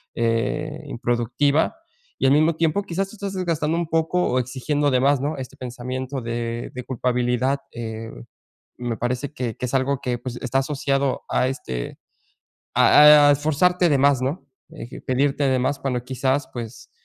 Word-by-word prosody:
eh, 135 +7 -1
improductiva 125 - 0 0.4
y - - 0
al - - +4
mismo 155 +2 +3
tiempo, 165 +5 +1
quizás 195 +1 -2
tú 220 - -12
estás 200 -1 -5
desgastando 165 -4 -1
un 170 -1 -1
poco 165 +2 +1
o 125 - +1
exigiendo 140 +4 -1
de 130 - +3
más, 140 +1 +3
¿no?, 150 +3 -2
este 130 -1 -8
pensamiento 130 +2 -5
de 115 0 -4
de 125 - -6
culpabilidad, 125 +2 0
eh, 115 -1 -6 0.7
me 120 -2 -3
parece 125 +4 -2
que 125 -7 -4
que 125 - -3
es 125 - -5
algo 135 +1 +1
que, 125 -1 -2
pues, 125 0 -6
está 130 +1 0
asociado 135 -1 -1
a 130 - +1
este, 65 - -5 0.8
a 150 0 +8
e - - +7
esforzarte 165 +5 +2
de 140 - +3
más, 140 -1 +3
¿no?, 140 +8 -3 0.2
de 120 - -10
pedirte 140 +2 +1
de 130 -1 +2
más 130 +3 0
cuando 125 -3 -2
quizás, 130 +2 -1
pues, 120 -1 -8
135 Hz, 170 wpm, -23 LUFS, 125-150 Hz, 0.8 s, a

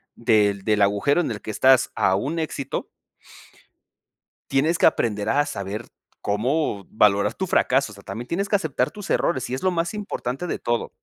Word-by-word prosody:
del 105 -4 +2
del 105 -1 +1
agujero 105 +11 +3
en 155 - -2
el 105 - -6
que 110 - -5
estás 130 +4 +4
a 95 - +2
un 145 +12 -2
éxito 155 -4 -3 1.7
tienes 150 +5 +2
que - - +5
aprender 105 -9 +1
a 145 +1 +2
saber 105 -3 -5 0.3
cómo 110 0 -1
valorar 100 -2 +3
tu 190 - -3
fracaso, 135 -8 +2
o - - -12
sea, 100 - -14
también 120 +2 -6
tienes 195 +4 -1
que 205 - +3
aceptar 145 -8 -1
tus 205 -2 -9
errores, 130 -7 0
y - - -1
es 130 - -5
lo 185 - +3
más 170 -1 -1
importante 180 -8 -4
de - - -3
todo. 120 0 -1
125 Hz, 185 wpm, -23 LUFS, 105-160 Hz, 1.7 s, que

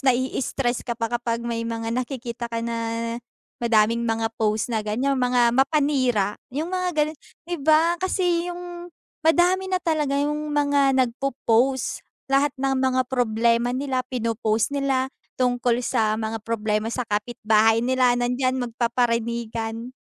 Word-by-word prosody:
nai-stress 260 -1 0
ka 235 - -4
pa 230 0 -3
kapag 235 -1 -1
may 235 -1 -2
mga 230 0 -3
nakikita 240 -1 -4
ka 230 0 -3
na, 230 0 -3 0.4
madaming 230 -1 +3
mga 225 0 -1
post 215 +2 0
na 220 - +1
ganyan, 220 +6 0
mga 245 -1 +3
mapanira. 265 -6 +1
Yung 310 +8 -4
mga 365 -1 0 0.2
ganun. 310 +1 -6 0.3
'Di 350 +1 -3
ba? 320 +4 +3
Kasi 355 -2 0
yung 350 0 -7 0.3
madami 355 +4 +3
na 370 - +1
talaga 300 -4 +1
yung 300 +1 -1
mga 285 -2 +3
nagpo-post. 255 0 0 0.3
Lahat 275 +2 +4
ng 270 0 0
mga 260 -1 +2
problema 235 -1 +1
nila 265 -1 -1
pinopost 230 -1 0
nila, 270 -1 0 0.2
tungkol 245 -1 +1
sa 220 -4 +1
mga 220 0 -3
problema 215 0 -1
sa 250 +1 -2
kapitbahay 220 +1 +2
nila, 255 -1 +3
nandiyan 250 +2 0
magpaparinigan. 235 -1 -2
245 Hz, 135 wpm, -24 LUFS, 230-275 Hz, 0.4 s, Lahat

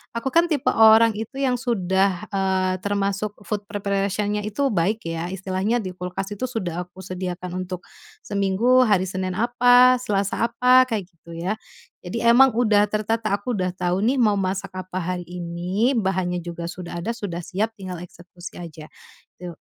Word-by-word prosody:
aku 230 +3 -2
kan 335 +1 +4
tipe 290 -4 +1
orang 220 0 +6
itu 225 +5 -6
yang 255 -2 +1
sudah, 195 -4 0
eee, 190 -1 +1
termasuk 200 0 -1
food 210 -2 -2
preparation-nya 205 +1 -1
itu 245 +7 0
baik 205 +5 0
ya, 165 +1 -3
istilahnya 190 +4 -1
di 185 -1 -5
kulkas 180 +2 -5
itu 230 - -3
sudah 180 -7 -3
aku 180 - -17
sediakan 185 0 -4
untuk 180 -1 -7 0.4
seminggu, 205 +6 +3
hari 195 -3 +3
Senin 185 0 -3
apa, 245 +2 +5
Selasa 205 0 0
apa, 250 +2 +5
kayak 210 -6 -2
gitu 165 0 -12
ya. 180 +5 -1 0.5
Jadi 185 +6 -4
emang 250 +3 +7
udah 215 -4 +4
tertata, 215 +1 -1
aku 225 +4 -3
udah 185 -1 -1
tahu 180 +2 -1
nih 260 +4 +2
mau 210 -3 +4
masak 190 0 -2
apa 185 0 -5
hari 180 +1 -3
ini, 180 +7 -1
bahannya 185 -3 0
juga 170 0 -6
sudah 175 -1 -7
ada, 225 - -1
sudah 200 -7 -5
siap 200 +5 -2
tinggal 185 -2 -6
eksekusi 175 0 -11
aja, 160 -3 -9 0.5
tu 175 -1 -7
195 Hz, 165 wpm, -23 LUFS, 180-225 Hz, 0.5 s, emang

